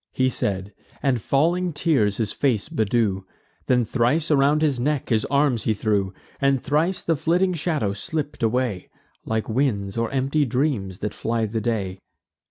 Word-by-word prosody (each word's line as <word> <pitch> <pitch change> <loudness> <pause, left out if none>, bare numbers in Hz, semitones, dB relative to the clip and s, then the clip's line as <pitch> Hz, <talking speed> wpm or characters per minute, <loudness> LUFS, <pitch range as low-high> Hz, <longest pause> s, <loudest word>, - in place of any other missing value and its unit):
He 130 0 +2
said; 100 -4 -2 0.3
and 130 -5 +1
falling 170 - +1
tears 140 - +2
his 110 -3 -1
face 125 -8 0
bedew: 110 -3 +1 0.5
Then 125 -2 +3
thrice 130 +8 +1
around 145 +2 +3
his 140 -5 +1
neck 145 +2 -1
his 110 -2 +2
arms 140 -5 +1
he 110 - +2
threw; 100 -2 0 0.3
And 140 -1 +2
thrice 155 +8 0
the 165 - +1
flitting 180 +5 +1
shadow 155 - -1
slipp'd 145 +8 -3
away, 115 -4 0 0.4
Like 110 -1 -1
winds, 110 -5 0
or 115 -1 0
empty 140 +3 +1
dreams 125 -8 -1
that 105 - -3
fly 115 0 -1
the 110 +1 -3
day. 100 -5 -2
125 Hz, 160 wpm, -23 LUFS, 110-145 Hz, 0.5 s, Then